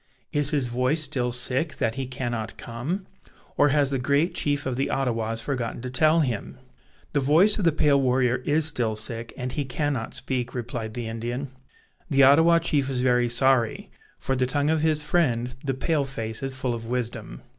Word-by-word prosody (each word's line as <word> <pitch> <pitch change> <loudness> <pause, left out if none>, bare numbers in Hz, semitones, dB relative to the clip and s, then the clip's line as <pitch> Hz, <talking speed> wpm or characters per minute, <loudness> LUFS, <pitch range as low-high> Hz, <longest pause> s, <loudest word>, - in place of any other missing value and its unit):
Is 145 -1 +2
his 145 -5 +1
voice 125 +6 0
still 130 -4 -2
sick, 130 +5 +1
that 110 - 0
he 135 +1 -4
cannot 120 -3 -4
come? 145 +12 -4 0.5
or 145 - +4
has 145 -1 +2
the 135 - 0
great 140 +7 +1
chief 145 -1 -1
of 130 -2 -2
the 135 - -1
Ottawas 115 -4 -1
forgotten 125 -4 -3
to 125 - -5
tell 155 +4 +4
him?" 125 -8 -3 0.6
"The 145 - +2
voice 165 +11 +4
of 195 - 0
the 165 - +5
pale 145 -2 +3
warrior 125 -1 +2
is 145 +5 +1
still 120 -8 0
sick, 115 +1 -1
and 125 0 -4
he 145 - -2
cannot 135 -2 -3
speak," 125 -2 -3
replied 115 -2 -5
the 120 -2 -4
Indian. 120 +4 -4 0.6
"The 140 -1 +4
Ottawa 160 +5 +6
chief 145 -5 0
is 130 -2 -1
very 125 -1 +2
sorry; 125 -1 +1 0.3
for 135 - -2
the 130 0 +1
tongue 145 +3 +1
of 160 -1 +1
his 155 -1 +2
friend, 125 -7 0
the 135 -2 -1
pale 145 +1 0
face, 115 -4 -5
is 135 -1 -3
full 130 -2 -1
of 115 -1 -6
wisdom." 120 - -4
130 Hz, 190 wpm, -25 LUFS, 120-145 Hz, 0.6 s, Ottawa